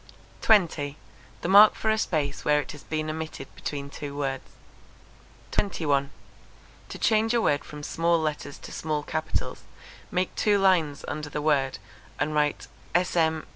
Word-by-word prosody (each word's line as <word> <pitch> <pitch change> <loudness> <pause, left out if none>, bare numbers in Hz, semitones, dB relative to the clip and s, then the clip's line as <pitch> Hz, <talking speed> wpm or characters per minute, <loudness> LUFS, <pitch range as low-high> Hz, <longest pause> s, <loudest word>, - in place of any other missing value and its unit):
20. 160 -9 +3 0.4
The - - -2
mark 205 +3 +8
for 220 - 0
a 220 - +2
space 150 -7 -1
where 150 0 +3
it 145 - -5
has 150 - -10
been 155 0 -3
omitted 160 0 -6
between 140 -1 -5
two 145 -1 -7
words. 135 -2 -3 1.0
21. 145 -8 0 0.8
To - - -7
change 225 +1 +2
a - - +4
word 145 -9 +1
from 150 0 -9
small 170 +2 +1
letters 150 -2 -3
to - - -11
small 155 -2 -2
capitals, 155 +1 -3 0.5
make 180 0 -1
two 205 -1 +2
lines 175 -7 +2
under 150 -1 -4
the 150 - -3
word, 140 -3 +1 0.4
and 150 +1 0
write 150 -1 +1 0.3
_sm. 165 -3 +2
155 Hz, 150 wpm, -26 LUFS, 145-175 Hz, 1.0 s, mark